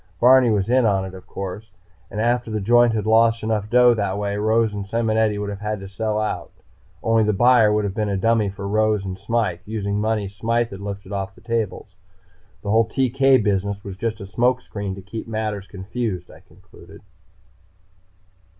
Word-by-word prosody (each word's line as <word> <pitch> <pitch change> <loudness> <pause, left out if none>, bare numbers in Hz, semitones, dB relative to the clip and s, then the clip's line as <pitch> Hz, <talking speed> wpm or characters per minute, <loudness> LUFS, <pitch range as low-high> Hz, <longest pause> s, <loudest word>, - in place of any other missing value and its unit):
Barney 125 0 +6
was 105 -3 +1
in 125 +2 +3
on 100 -4 +2
it, 95 - -8
of 95 - -12
course. 100 +3 -6 0.4
And 105 - -6
after 120 +1 +1
the 110 -1 -2
joint 120 +3 +4
had 110 -1 -1
lost 115 +1 +3
enough 110 -1 -1
dough 125 +1 +6
that 100 -3 -2
way, 100 0 -2
Rose 110 +1 +1
and 100 -1 -5
Simonetti 110 -1 +1
would 100 0 -3
have 100 - -7
had 105 0 -3
to 95 - -8
sell 105 +2 -2
out. 110 - -3 0.5
Only 115 -1 +3
the 105 0 +1
buyer 115 +1 +5
would 105 0 +1
have 100 -2 -2
been 105 0 -1
a 100 - 0
dummy 115 0 +2
for 100 +1 -6
Rose 110 -1 +1
and 95 -1 -4
Smythe, 105 -2 -1
using 105 0 -2
money 110 -2 0
Smythe 115 +4 -1
had 100 - -8
lifted 100 -1 -7
off 95 -1 -4
the - - -18
tables. 110 -5 -3 0.7
"The 100 - -2
whole 110 +1 +4
TK 135 0 +3
business 100 0 -1
was 100 -2 -7
just 110 +2 -3
a 100 - -7
smoke 120 +5 +1
screen 100 -2 -5
to 95 - -10
keep 110 +4 -7
matters 110 -3 -3
confused," 100 -2 -5
I - - -15
concluded. - - -17
105 Hz, 195 wpm, -22 LUFS, 100-115 Hz, 0.7 s, Barney